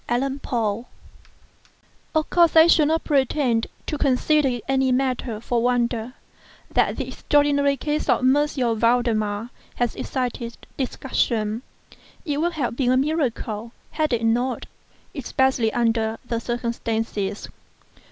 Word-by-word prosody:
VALDEMAR 240 -4 -1 1.3
Of 310 -1 +2
course 340 -2 +4
I 320 0 +9
shall 325 -3 +5
not 320 +1 +1
pretend 265 -5 +1 0.2
to 300 - -3
consider 285 +2 +3
it 245 -2 -4
any 265 -1 +2
matter 250 -3 -1
for 235 +1 -1
wonder, 240 -1 0 0.6
that - - +2
the - - -3
extraordinary 285 -1 +2
case 300 +1 -2
of - - +3
M. 260 +1 +4 0.4
Valdemar 230 -2 +1 0.2
has 240 -1 -1
excited 245 -2 -3 0.2
discussion. 230 -4 -1 0.6
It 295 -2 -1
would 345 +1 0
have 265 -7 -2
been 250 -1 +1
a 255 - +4
miracle 255 -6 -1 0.2
had 310 -1 0
it 235 -1 0
not—especially 250 +1 -1
under 225 -2 0
the 235 -1 -2
circumstances. 225 -4 -3
250 Hz, 120 wpm, -23 LUFS, 230-280 Hz, 1.3 s, I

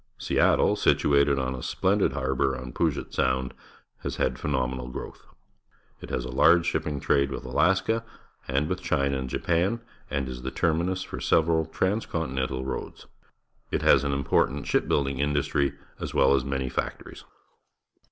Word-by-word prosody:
Seattle, - - +3
situated 70 -1 +3
on 65 -1 -1
a 65 - -6
splendid 95 -6 +1
harbour 65 -1 0
on 65 0 -8
Paget 80 -4 -1
Sound, 65 0 0 0.5
has - - -4
had - - +1
a - - -12
phenomenal 65 -3 -2
growth. 65 - -8 0.7
It - - -9
has 60 - -2
a 65 - -5
large 85 +6 +5
ship 80 - -1
ping 75 -3 -3
trade 70 0 +2
with 65 - -6
Alaska 95 - +2 0.4
and 70 +3 0
with 90 +2 -3
China 70 -5 0
and 65 -1 -4
Japan 90 - 0 0.3
and 70 -1 -2
is 65 -1 -6
the 65 - -3
terminus 85 +5 0
for - - -7
several 80 -1 +2
transcontinental 80 - -2
roads. 65 - -6 0.6
It - - -1
has - - +5
an 70 - 0
important 70 0 +1
ship - - +1
building 70 -2 0
in 75 +1 +1
dustry, 70 -1 0 0.2
as - - -5
well 65 - +5
as 65 -2 +2
manj'^ 65 -1 -2
factories. - - -5
70 Hz, 160 wpm, -26 LUFS, 65-80 Hz, 0.7 s, large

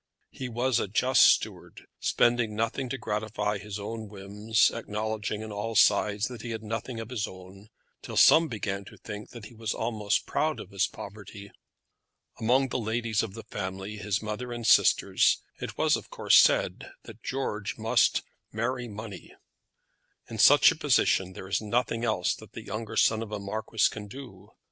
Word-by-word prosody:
He 130 -2 -6
was 120 +1 +1
a - - -1
just 125 +6 +3
steward, - - +2
spending 120 -3 +2
nothing 115 +4 -2
to 135 - -3
gratify 105 -2 -2
his 105 0 -6
own 110 +1 -6
whims, 105 +2 +1
acknowledging 110 -1 -3
on 110 - -7
all 105 +2 -4
sides 105 0 +4
that 125 -3 -8
he 120 - -6
had 110 -1 -5
nothing 115 +2 -4
of 115 +1 -7
his 110 -5 -2
own, 95 +3 -13 0.3
till - - -7
some 165 +1 +7
began 100 -5 -4
to - - -13
think 105 0 -8
that 120 -4 -10
he 120 - -12
was 110 -1 -3
almost 110 -3 -1
proud 155 0 -1
of 95 - -10
his 100 +1 +1
poverty. 100 0 -10 0.9
Among 130 +4 +2
the 125 - -2
ladies 110 -1 -1
of 110 -4 -5
the - - -8
family, 95 +3 -5
his 105 +1 -2
mother 110 +3 -4
and 120 -1 -5
sisters, - - +4 0.2
it - - -6
was - - +3
of - - -7
course - - +2
said - - +3
that 115 0 -12
George 120 -6 -3
must - - +2 0.3
marry 120 +3 -2
money. 105 -2 -9 0.9
In - - -7
such - - +7
a - - -4
position 95 -1 +2
there 95 - -9
is 95 - 0
nothing 115 +2 -1
else 105 -6 +1
that - - -14
the - - -8
younger 110 0 -5
son 110 0 +3
of 110 -2 -6
a 105 - -2
marquis 110 +2 0
can 105 -1 -7
do. 105 -5 -11
110 Hz, 175 wpm, -28 LUFS, 105-115 Hz, 0.9 s, some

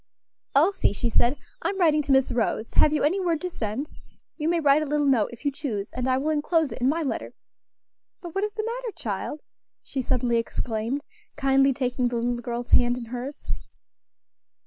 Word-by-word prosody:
"Elsie," 340 - +4
she 235 - -1
said, 240 +4 +2 0.2
"I - - 0
am 395 - -3
writing 310 -4 +4
to 285 - -2
Miss 265 -1 +4
Rose; 230 -1 -1
have 300 - +5
you 300 - +1
any 340 +7 +2
word 340 -4 +1
to 365 -1 -3
send? 230 +2 -3 0.5
You 310 0 -1
may 340 0 +2
write 290 -1 +4
a - - -1
little 295 0 +1
note, 255 -7 +3
if 240 +5 -12
you 285 - +2
choose, 225 -8 -4
and 250 0 -2
I 255 0 +3
will 295 +4 0
enclose 310 0 +1
it - - -7
in 255 - +4
my 325 +3 0
letter. 280 - -3 0.9
But 345 -3 -8
what 390 - 0
is 420 0 -2
the 435 0 -3
matter, 470 -1 -4
child?" 300 - -4 0.4
she 270 - -3
suddenly 245 -2 +1
exclaimed, 230 +4 -2 0.3
kindly 275 -1 +4
taking 250 -1 0
the 240 - -2
little 240 +1 0
girl's 240 0 -5
hand 245 0 +5
in 245 - -6
hers. 250 +5 -6
275 Hz, 200 wpm, -26 LUFS, 245-310 Hz, 0.9 s, have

